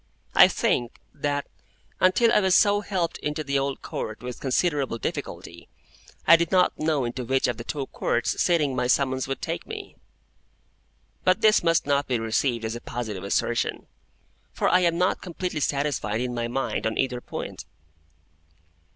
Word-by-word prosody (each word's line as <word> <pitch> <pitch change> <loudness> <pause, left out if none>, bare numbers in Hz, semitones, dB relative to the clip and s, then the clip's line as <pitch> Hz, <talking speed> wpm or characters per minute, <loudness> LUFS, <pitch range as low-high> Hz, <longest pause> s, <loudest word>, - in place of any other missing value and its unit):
I - - +8
think 120 -1 -1
that, 145 0 -2 0.5
until 230 +6 +4
I - - +6
was 190 -3 +3
so 205 -1 +4
helped 185 -5 -2
into 150 +1 -3
the 140 -1 0
Old 135 0 -3
Court 110 +2 -5
with 125 -1 -6
considerable 140 -2 0
difficulty, 85 -4 -6 0.6
I 165 - +9
did 170 -1 -1
not 185 -1 +3
know 155 -4 +1
into 125 +2 -4
which 130 +2 +1
of 120 - -2
the 115 - -6
two 140 +2 -3
Courts 120 -2 -1
sitting 150 -7 +2
my 125 -1 0
summons 130 0 +1
would 135 - -4
take - - -4
me. - - -8 1.3
But 185 +4 +3
this 215 0 +5
must 165 -1 +2
not 140 0 +1
be 125 - +1
received 115 +1 0
as 110 +1 -3
a 120 - -7
positive 110 -6 -5
assertion, 115 +4 -1 0.7
for - - 0
I 180 - +5
am 170 -2 +2
not 180 +2 +1
completely 180 -2 -4
satisfied 140 -7 -1
in 125 0 -2
my 120 -1 -2
mind 120 -3 -2
on 110 - -3
either 125 -2 -1
point. - - -7
135 Hz, 170 wpm, -25 LUFS, 120-170 Hz, 1.3 s, I